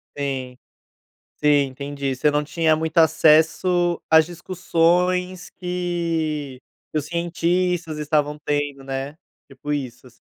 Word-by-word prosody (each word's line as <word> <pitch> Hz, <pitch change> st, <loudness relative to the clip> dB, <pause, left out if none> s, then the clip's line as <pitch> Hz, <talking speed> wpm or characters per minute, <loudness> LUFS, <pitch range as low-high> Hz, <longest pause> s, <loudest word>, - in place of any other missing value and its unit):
Sim. 130 Hz, -3 st, -4 dB, 0.8 s
Sim, 150 Hz, -, -1 dB, 0.2 s
entendi. 140 Hz, 0 st, -4 dB
Você 145 Hz, +4 st, +2 dB
não 150 Hz, 0 st, +1 dB
tinha 160 Hz, +1 st, +1 dB
muito 160 Hz, 0 st, -4 dB
acesso 165 Hz, +2 st, +3 dB
às 160 Hz, -1 st, +6 dB
discussões 180 Hz, +1 st, 0 dB
que 165 Hz, -6 st, -3 dB, 0.3 s
que -, -, 0 dB
os 145 Hz, -, -7 dB
cientistas 170 Hz, 0 st, -1 dB
estavam 150 Hz, 0 st, 0 dB
tendo, 145 Hz, -1 st, -1 dB
né. 135 Hz, +2 st, -5 dB, 0.4 s
Tipo 145 Hz, +2 st, -5 dB
isso, 130 Hz, -3 st, -5 dB
assi 125 Hz, -, -19 dB
155 Hz, 115 wpm, -22 LUFS, 145-175 Hz, 0.8 s, às